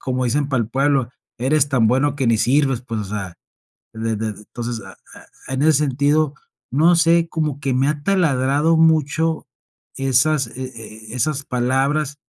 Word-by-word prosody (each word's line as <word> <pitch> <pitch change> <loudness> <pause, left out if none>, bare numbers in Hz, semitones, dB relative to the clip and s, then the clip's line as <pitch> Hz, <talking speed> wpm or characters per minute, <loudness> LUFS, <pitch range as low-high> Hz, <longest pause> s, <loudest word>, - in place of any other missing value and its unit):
como 130 -1 -2
dicen 140 +4 0
para 130 -4 +1
el 110 - -6
pueblo, 135 -1 +1 0.3
eres 140 +3 +2
tan 125 -5 +2
bueno 135 +4 +1
que 135 -3 -1
ni 115 - +3
sirves. 135 0 +2
Pues, 115 -3 -4
o 105 - -4
sea, 95 -3 -5 0.6
de 110 0 -2
de 110 +1 -3
entonces, 115 +3 -6
a 95 - -11
e - - -17
e 130 - -2
en 135 - -1
ese 160 - +5
sentido, 145 +1 +1 0.4
no 160 +7 +4
sé, 170 0 +3
como 155 -4 -2
que 135 -3 -2
me 135 +2 +2
ha 150 -1 -2
taladrado 150 -4 +2
mucho 160 0 +2 0.5
esas, 135 +2 +2
e 130 - -5 0.5
e - - -7
esas 140 +2 -1
palabras, 135 +4 0
135 Hz, 175 wpm, -20 LUFS, 125-150 Hz, 0.6 s, ese